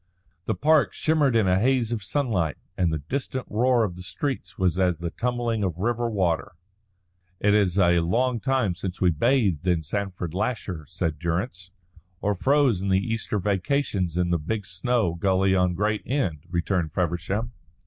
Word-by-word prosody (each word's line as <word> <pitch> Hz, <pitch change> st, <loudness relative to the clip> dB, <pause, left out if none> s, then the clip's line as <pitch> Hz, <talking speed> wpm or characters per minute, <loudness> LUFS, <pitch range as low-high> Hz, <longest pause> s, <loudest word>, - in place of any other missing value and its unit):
The -, -, -1 dB
park 155 Hz, 0 st, +3 dB
shimmered 150 Hz, -5 st, +2 dB
in 110 Hz, -4 st, +3 dB
a 90 Hz, 0 st, +3 dB
haze 125 Hz, 0 st, +2 dB
of 115 Hz, -3 st, -2 dB
sunlight, 100 Hz, -, -1 dB, 0.2 s
and 90 Hz, -3 st, +1 dB
the 80 Hz, -, 0 dB
distant 130 Hz, -1 st, -3 dB
roar 120 Hz, +2 st, +3 dB
of 90 Hz, -5 st, -2 dB
the 90 Hz, -, -9 dB
streets 130 Hz, +9 st, -4 dB
was 90 Hz, -1 st, +1 dB
as 90 Hz, -3 st, +2 dB
the 85 Hz, +1 st, -4 dB
tumbling 120 Hz, -1 st, -1 dB
of 90 Hz, -4 st, -2 dB
river 120 Hz, +4 st, 0 dB
water. 95 Hz, -3 st, 0 dB, 0.9 s
"It 105 Hz, 0 st, +3 dB
is 100 Hz, -3 st, +2 dB
a 85 Hz, -2 st, +4 dB
long 120 Hz, +8 st, +1 dB
time 130 Hz, -5 st, +1 dB
since 90 Hz, +1 st, -6 dB
we 90 Hz, -2 st, +4 dB
bathed 95 Hz, -, +1 dB
in 85 Hz, -3 st, +2 dB
Sandford 90 Hz, -1 st, -3 dB
Lasher," 95 Hz, -6 st, -3 dB
said 85 Hz, -3 st, -3 dB
Durrance. 90 Hz, +3 st, -3 dB, 0.5 s
"Or 105 Hz, -, 0 dB
froze 130 Hz, -1 st, +2 dB
in 100 Hz, -, -1 dB
the 95 Hz, -, +4 dB
Easter 110 Hz, +2 st, -2 dB
vacations 95 Hz, -, 0 dB
in 90 Hz, -1 st, +1 dB
the 85 Hz, -, +2 dB
big 105 Hz, +6 st, -3 dB
snow 100 Hz, 0 st, 0 dB
gully 95 Hz, +2 st, +2 dB
on 90 Hz, -1 st, +2 dB
Great 105 Hz, +3 st, 0 dB
End," 95 Hz, -, -1 dB
returned 85 Hz, -1 st, -1 dB
Feversham. 95 Hz, +7 st, -1 dB
95 Hz, 170 wpm, -25 LUFS, 90-120 Hz, 0.9 s, a